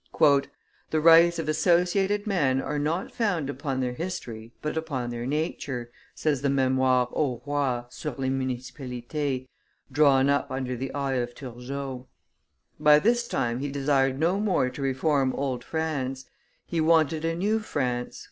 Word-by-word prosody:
"The 140 -1 +5 0.5
rights 165 +2 +7
of 165 -2 -3
associated 180 +6 +2
men 145 -11 +1
are 145 +2 -2
not 160 +6 -1
founded 170 - -1
upon 135 -1 -2
their 125 -1 -1
history 120 -9 -6
but 150 - -3
upon 140 -7 -3
their 120 +1 -4
nature," 135 -5 -3 0.2
says 150 -4 0
the 140 - +1
Memoire 130 -2 +2
au 130 -6 0
Roi 140 -4 0
sur 150 - -5
les 130 -1 -1
Municipalites, 130 +1 -3 0.4
drawn 135 -1 +4
up 140 0 +1
under 130 -1 -3
the 130 +2 -4
eye 135 -2 -1
of 120 0 -3
Turgot. 130 +1 -6 0.7
By 150 0 +7
this 235 +7 +2
time 120 - -1
he 145 +1 -3
desired 135 -1 +1
no 170 +6 +1
more 185 -11 +1
to 140 - -8
reform 135 0 +1
old 135 -3 -2
France; 135 -5 -3 0.4
he 165 -2 -1
wanted 160 -1 +3
a 165 0 0
new 210 +6 +1
France. 125 - -3
140 Hz, 150 wpm, -26 LUFS, 130-160 Hz, 0.7 s, rights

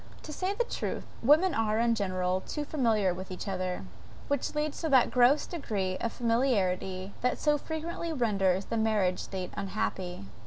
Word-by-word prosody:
To 305 - -7
say 370 +5 -1
the 485 - +2
truth, - - -4 0.2
women 310 +9 +5
are, 220 -1 +1
in 235 0 +3
general, 185 -3 0
too 295 +7 -4
familiar 225 - +2
with 185 +1 -7
each 185 +1 -6
other, 185 - -2 0.5
which 285 +1 -1
leads 300 0 -1
to 320 - -1
that 260 -4 +5
gross 250 +4 +5
degree 200 - -2
of 230 - -1
familiarity 200 -6 0
that 250 0 +1
so 300 -1 +3
frequently 330 +2 -4
renders 200 - +1
the 230 - -2
marriage 210 -5 +2
state 185 -2 -5
unhappy. 190 - -3
220 Hz, 165 wpm, -30 LUFS, 190-285 Hz, 0.5 s, women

